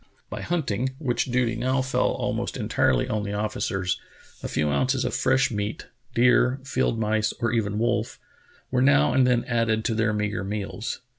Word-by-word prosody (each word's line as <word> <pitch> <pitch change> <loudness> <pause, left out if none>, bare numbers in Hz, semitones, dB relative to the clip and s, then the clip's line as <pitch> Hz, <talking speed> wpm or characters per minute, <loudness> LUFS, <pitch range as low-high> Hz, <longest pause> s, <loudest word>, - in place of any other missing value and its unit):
By - - -5
hunting, 130 -7 -1
which 130 -5 0
duty 125 -2 0
now 130 +3 0
fell 130 - +1
almost - - -2
entirely - - +1
on 110 - -1
the 100 0 -4
officers, 100 -3 -2 0.4
a - - -4
few 75 -1 0
ounces 130 - +1
of - - -2
fresh 130 -1 +2
meat 105 0 -4
— - - -33
deer, 125 +2 +4
field 130 -4 0
mice, 110 0 +1
or 115 -2 0
even 105 -3 0
wolf 115 +2 -1 0.3
— - - -31
were 125 -1 +2
now 125 - +4
and 130 -1 +4
then 125 -1 +2
added 115 -2 0
to 115 - +1
their 110 -1 +1
meagre 105 -2 -2
meals. 100 +1 -4
115 Hz, 180 wpm, -25 LUFS, 105-125 Hz, 0.4 s, deer